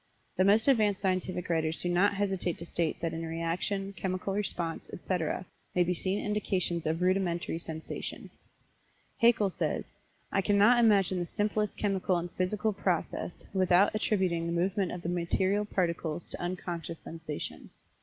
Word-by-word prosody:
The 185 Hz, -, +3 dB
most 210 Hz, +5 st, +4 dB
advanced 215 Hz, -7 st, +4 dB
scientific 185 Hz, -1 st, -1 dB
writers 160 Hz, -1 st, 0 dB
do -, -, -1 dB
not 190 Hz, +4 st, +3 dB
hesitate 190 Hz, -3 st, -1 dB
to 170 Hz, -, -7 dB
state 170 Hz, -2 st, -1 dB
that 165 Hz, -1 st, -1 dB
in 165 Hz, 0 st, -4 dB
reaction, 170 Hz, +5 st, -2 dB
chemical 190 Hz, +1 st, -2 dB
response, 175 Hz, -5 st, -3 dB
etc., 180 Hz, 0 st, -2 dB, 0.3 s
may 180 Hz, -, +5 dB
be 180 Hz, +1 st, 0 dB
seen 190 Hz, +3 st, -2 dB
indications 185 Hz, -5 st, 0 dB
of 160 Hz, +3 st, 0 dB
rudimentary 175 Hz, -3 st, +1 dB
sensation. 160 Hz, -1 st, -6 dB, 0.9 s
Haeckel 230 Hz, -5 st, +4 dB
says: -, -, 0 dB, 0.5 s
"I 195 Hz, -, +2 dB
cannot 205 Hz, +5 st, +5 dB
imagine 195 Hz, -4 st, +4 dB
the 175 Hz, -, -2 dB
simplest 210 Hz, 0 st, -1 dB
chemical 195 Hz, -3 st, +1 dB
and 170 Hz, 0 st, -4 dB
physical 210 Hz, +4 st, 0 dB
process 180 Hz, -3 st, -2 dB
without 185 Hz, 0 st, +4 dB
attributing 185 Hz, -6 st, +1 dB
the 170 Hz, -, -1 dB
movement 190 Hz, +1 st, +1 dB
of 180 Hz, -1 st, -6 dB
the 170 Hz, -, -2 dB
material 185 Hz, +4 st, +1 dB
particles 170 Hz, -4 st, -2 dB
to -, -, -3 dB
unconscious 175 Hz, -2 st, -4 dB
sensation. 160 Hz, -2 st, -7 dB
185 Hz, 150 wpm, -30 LUFS, 170-200 Hz, 0.9 s, may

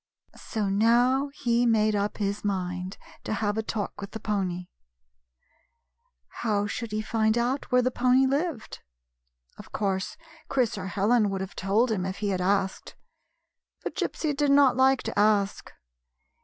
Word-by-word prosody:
So 215 Hz, -3 st, -2 dB
now 240 Hz, +7 st, +3 dB
he 240 Hz, -3 st, +1 dB
made 215 Hz, -2 st, +3 dB
up 205 Hz, 0 st, -1 dB
his 200 Hz, 0 st, -2 dB
mind 185 Hz, -1 st, -3 dB, 0.3 s
to -, -, -3 dB
have 205 Hz, 0 st, -1 dB
a 220 Hz, -, 0 dB
talk 215 Hz, -2 st, -4 dB
with 200 Hz, -, -8 dB
the 220 Hz, -, -5 dB
pony. 190 Hz, -4 st, -2 dB, 1.8 s
How 205 Hz, -3 st, +1 dB
should 220 Hz, +2 st, -4 dB
he 215 Hz, 0 st, -2 dB
find 220 Hz, 0 st, +1 dB
out 250 Hz, +4 st, -1 dB
where 250 Hz, 0 st, +4 dB
the 255 Hz, -, +1 dB
pony 255 Hz, +2 st, +3 dB
lived? 280 Hz, -2 st, -2 dB, 0.8 s
Of -, -, -12 dB
course, 195 Hz, -2 st, -2 dB, 0.3 s
Chris 250 Hz, -5 st, +1 dB
or 190 Hz, -2 st, -5 dB
Helen 210 Hz, +3 st, +2 dB
would 195 Hz, -1 st, -3 dB
have 190 Hz, 0 st, -6 dB
told 215 Hz, +6 st, +1 dB
him 195 Hz, -4 st, -1 dB
if 190 Hz, +1 st, -4 dB
he 205 Hz, -1 st, -2 dB
had 185 Hz, -2 st, -1 dB
asked; 190 Hz, 0 st, -1 dB, 0.9 s
but -, -, -4 dB
Gypsy 300 Hz, -3 st, -2 dB
did 290 Hz, 0 st, +1 dB
not 280 Hz, -1 st, +5 dB
like 265 Hz, 0 st, +3 dB
to -, -, -3 dB
ask. 205 Hz, -1 st, +1 dB
215 Hz, 155 wpm, -27 LUFS, 200-245 Hz, 1.8 s, not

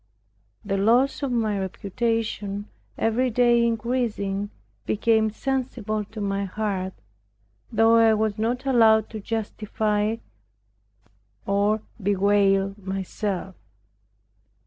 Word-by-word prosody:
The 195 Hz, -1 st, -1 dB
loss 240 Hz, +9 st, +3 dB
of 275 Hz, -2 st, -1 dB
my 220 Hz, -4 st, 0 dB
reputation 205 Hz, +1 st, -2 dB, 0.3 s
every 240 Hz, +3 st, +1 dB
day 240 Hz, 0 st, +4 dB
increasing, 225 Hz, -4 st, -1 dB, 0.4 s
became 220 Hz, 0 st, +2 dB
sensible 225 Hz, -3 st, -2 dB
to 220 Hz, +2 st, -10 dB
my 200 Hz, -1 st, -1 dB
heart, 190 Hz, -2 st, -3 dB, 0.8 s
though 225 Hz, +1 st, +5 dB
I 225 Hz, -1 st, +5 dB
was 215 Hz, 0 st, -1 dB
not 245 Hz, +4 st, -1 dB
allowed 225 Hz, -4 st, +4 dB
to 220 Hz, -, -5 dB
justify 215 Hz, 0 st, -1 dB, 1.3 s
or 205 Hz, +2 st, +1 dB, 0.2 s
bewail 195 Hz, 0 st, +2 dB
myself. 190 Hz, 0 st, -3 dB
215 Hz, 95 wpm, -24 LUFS, 200-230 Hz, 1.3 s, though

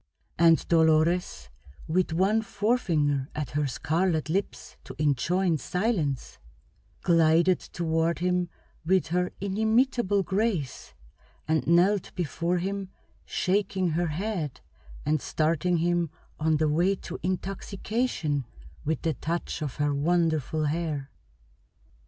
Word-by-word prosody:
And 165 Hz, -1 st, +5 dB
Dolores, 160 Hz, -, +2 dB, 0.4 s
with 175 Hz, +2 st, +1 dB
one 195 Hz, +7 st, +2 dB
forefinger 175 Hz, -, 0 dB
at 150 Hz, -4 st, -3 dB
her 145 Hz, 0 st, 0 dB
scarlet 160 Hz, +4 st, 0 dB
lips 190 Hz, +4 st, -3 dB
to -, -, -10 dB
enjoin 160 Hz, +4 st, +1 dB
silence, 180 Hz, -, -1 dB, 0.6 s
glided 170 Hz, +2 st, +4 dB
toward 165 Hz, 0 st, -1 dB
him 180 Hz, 0 st, 0 dB, 0.3 s
with 185 Hz, +1 st, +2 dB
her 180 Hz, +1 st, 0 dB
inimitable 220 Hz, +1 st, +2 dB
grace, 190 Hz, -, -2 dB, 0.5 s
and 160 Hz, 0 st, +1 dB
knelt 180 Hz, +4 st, +3 dB
before 175 Hz, +1 st, -1 dB
him 195 Hz, +1 st, -3 dB, 0.4 s
shaking 190 Hz, -1 st, 0 dB
her 170 Hz, +2 st, 0 dB
head 165 Hz, -, -3 dB, 0.4 s
and 150 Hz, -1 st, +1 dB
starting 165 Hz, +3 st, +1 dB
him 170 Hz, 0 st, +1 dB, 0.3 s
on 155 Hz, 0 st, +2 dB
the 155 Hz, +1 st, +2 dB
way 175 Hz, +6 st, +2 dB
to -, -, -8 dB
intoxication 190 Hz, -, -2 dB, 0.4 s
with 160 Hz, +2 st, -2 dB
the 160 Hz, -, +1 dB
touch 170 Hz, +1 st, -3 dB
of 145 Hz, -4 st, -3 dB
her 145 Hz, -1 st, 0 dB
wonderful 155 Hz, -1 st, +1 dB
hair. 150 Hz, -3 st, -2 dB
170 Hz, 110 wpm, -27 LUFS, 155-190 Hz, 0.6 s, And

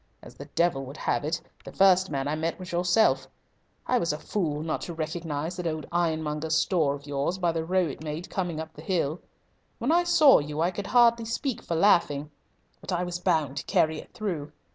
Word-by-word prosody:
As -, -, -12 dB
the 140 Hz, +3 st, -10 dB
devil 165 Hz, -5 st, +2 dB
would 140 Hz, +3 st, -9 dB
have -, -, -1 dB
it, 155 Hz, +3 st, -1 dB, 0.2 s
the -, -, -9 dB
first 190 Hz, -1 st, +4 dB
man 135 Hz, -1 st, -2 dB
I 145 Hz, -, -1 dB
met 160 Hz, +2 st, -2 dB
was 185 Hz, -1 st, -8 dB
yourself. 175 Hz, +5 st, +2 dB, 0.6 s
I 250 Hz, -, +2 dB
was 170 Hz, -6 st, 0 dB
a 150 Hz, -, -3 dB
fool 155 Hz, -4 st, -2 dB
not 160 Hz, -, -2 dB
to 170 Hz, -, -6 dB
recognise 160 Hz, +1 st, -3 dB
that 180 Hz, -2 st, -2 dB
old 155 Hz, -1 st, -3 dB
ironmonger's 160 Hz, -2 st, 0 dB
store 160 Hz, -5 st, +2 dB
of 140 Hz, 0 st, -12 dB
yours 145 Hz, +5 st, -1 dB
by 175 Hz, -2 st, +1 dB
the 165 Hz, -1 st, -2 dB
row 185 Hz, +2 st, +1 dB
it 150 Hz, 0 st, -6 dB
made 155 Hz, +3 st, -5 dB
coming 175 Hz, -4 st, -3 dB
up 160 Hz, 0 st, -7 dB
the 150 Hz, -, -11 dB
hill. 165 Hz, -2 st, -1 dB, 0.6 s
When 250 Hz, +5 st, 0 dB
I 345 Hz, +1 st, +4 dB
saw 325 Hz, -6 st, +6 dB
you 150 Hz, +1 st, -5 dB
I 170 Hz, +3 st, +2 dB
could 200 Hz, +2 st, -5 dB
hardly 235 Hz, -2 st, +4 dB
speak 235 Hz, +2 st, -2 dB
for 170 Hz, -, -3 dB
laughing. 155 Hz, -5 st, +3 dB, 0.5 s
But -, -, -7 dB
I 180 Hz, 0 st, 0 dB
was 175 Hz, 0 st, -4 dB
bound 150 Hz, -6 st, 0 dB
to -, -, -4 dB
carry 155 Hz, -1 st, +2 dB
it -, -, -12 dB
through. 170 Hz, -9 st, -4 dB
165 Hz, 215 wpm, -27 LUFS, 150-185 Hz, 0.6 s, saw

